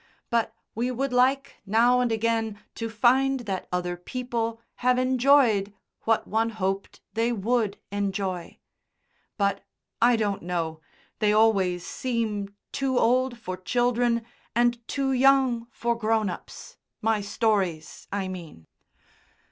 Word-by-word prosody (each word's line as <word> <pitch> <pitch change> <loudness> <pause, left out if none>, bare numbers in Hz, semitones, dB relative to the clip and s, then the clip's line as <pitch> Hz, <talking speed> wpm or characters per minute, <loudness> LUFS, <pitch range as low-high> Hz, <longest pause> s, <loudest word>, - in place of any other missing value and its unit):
But 230 -1 +1 0.2
we 240 +3 -1
would 255 +1 -2
like 260 +2 +2
now 230 +5 +4
and 245 -2 +1
again 225 -1 0
to 225 0 -4
find 260 +4 +3
that 195 -5 -4
other 180 0 -1
people 230 +3 -3 0.2
have 250 0 +2
enjoyed 255 -5 +3 0.3
what 225 0 +2
one 225 +1 +1
hoped 195 -3 -3
they 230 +3 +1
would 225 -1 0
enjoy. 195 -3 -3 0.8
But 200 -2 0 0.4
I 240 +1 +6
don't 205 -3 -1
know, 165 -2 -3 0.4
they 210 -1 +3
always 195 -5 +3
seem 220 -5 -2 0.2
too 270 -2 0
old 250 +1 +2
for 185 -5 -5
children 240 +3 +1 0.3
and 240 0 +3
too 275 -1 -1
young 260 -3 +3
for 235 0 -1
grown 220 -3 +1
ups - - -10 0.3
my 220 -1 +2
stories, 200 -6 -1
I 195 -1 -2
mean." 170 - -8
225 Hz, 125 wpm, -26 LUFS, 200-245 Hz, 0.8 s, I